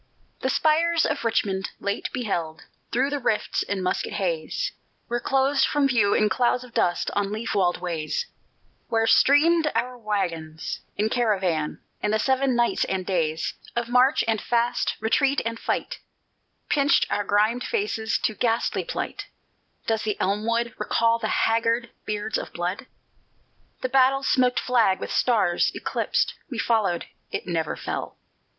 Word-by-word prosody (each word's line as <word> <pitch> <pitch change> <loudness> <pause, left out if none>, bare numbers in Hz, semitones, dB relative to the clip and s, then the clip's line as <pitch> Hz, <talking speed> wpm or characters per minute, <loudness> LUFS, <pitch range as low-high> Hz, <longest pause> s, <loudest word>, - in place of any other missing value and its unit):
The 260 - -1
spires 325 +3 +3
of 290 -3 -1
Richmond, 195 -4 0
late 200 +2 -2
beheld 170 -10 -3 0.3
Through 275 +4 +1
rifts 220 -4 0
in 195 -2 -2
musket 185 - -1
haze, - - -2 0.4
Were 240 0 -1
closed 270 +2 +2
from 290 -2 +2
view 220 -6 +3
in 215 - +3
clouds 245 +2 +1
of 250 -2 -14
dust 175 - +1
On 200 -1 -1
leaf 220 +2 -3
walled 180 -3 +1
ways, 170 - -2 0.6
Where 225 -1 +1
streamed 305 +6 +4
our 245 +2 -1
wagons 175 -8 -3 0.2
in 210 +2 +1
caravan; 190 -10 0 0.2
And 210 - 0
the 215 - +3
Seven 265 +2 +1
Nights 240 0 +2
and 190 -1 -2
Days 160 -4 -1 0.2
Of 235 0 -2
march 255 +4 +4
and 220 -2 +1
fast, 240 +1 0
retreat 270 +6 +2
and 230 0 -3
fight, - - -2 0.7
Pinched 285 -1 +3
our 205 - +1
grimed 215 +5 +2
faces 405 - -1
to 220 - +1
ghastly 230 +1 0
plight 410 -4 -5 0.6
Does 225 -1 0
the 210 -2 -2
elm 205 +3 0
wood 235 0 0
Recall 230 0 +2
the 220 - -2
haggard 230 +2 +1
beards 210 +1 -2
of - - -7
blood? 180 +7 -3 0.9
The 255 - -1
battle 270 +1 +4
smoked 250 -2 +3
flag, 230 -7 +2
with - - -5
stars 215 -8 +2
eclipsed, - - -1 0.2
We 255 - -5
followed 215 -7 +1 0.2
(it - - -4
never 165 -3 -1
fell!) - - -5
230 Hz, 150 wpm, -25 LUFS, 200-255 Hz, 0.9 s, streamed